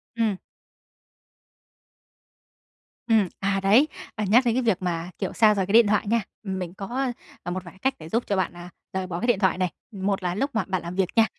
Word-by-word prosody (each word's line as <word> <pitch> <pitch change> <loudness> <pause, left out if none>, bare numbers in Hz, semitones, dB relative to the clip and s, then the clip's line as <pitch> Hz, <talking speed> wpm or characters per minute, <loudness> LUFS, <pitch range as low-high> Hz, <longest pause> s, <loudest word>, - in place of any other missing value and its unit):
Ừm. 220 -4 +1 2.7
Ừm. 220 -5 +4
À, 195 0 +1
đấy, 225 +10 +6 0.3
và 210 - -1
nhắc 240 +6 +5
đến 235 -1 +2
cái 255 - +2
việc 220 -6 +1
mà, 175 -1 -2
kiểu, 190 - -2
xa 215 -2 +5
rời 195 -2 +1
cái 195 - -3
điện 230 -2 +7
thoại 210 0 +1
nha, 230 +2 +2 0.2
ừm, 190 -2 -3
mình 180 -1 -5
có, 245 +6 -2 0.3
à, 175 - -2
một 185 +1 -3
vài 170 - -10
cái 190 - -20
cách 265 +6 +1
để 160 - -9
giúp 230 +7 +1
cho 200 - +1
bạn, 185 - 0
à, 175 0 -10 0.2
rời 190 -1 -2
bỏ 175 -1 -4
cái 240 - -2
điện 235 -5 +3
thoại 190 -4 +2
này. 185 -1 +1 0.2
Một 195 -2 -2
là 175 0 -1
lúc 275 +7 0
mà 220 - +2
bạn 185 -2 -1
làm 170 +1 -6
việc 190 -1 +2
nha, 225 -1 +6
195 Hz, 230 wpm, -25 LUFS, 185-225 Hz, 2.7 s, điện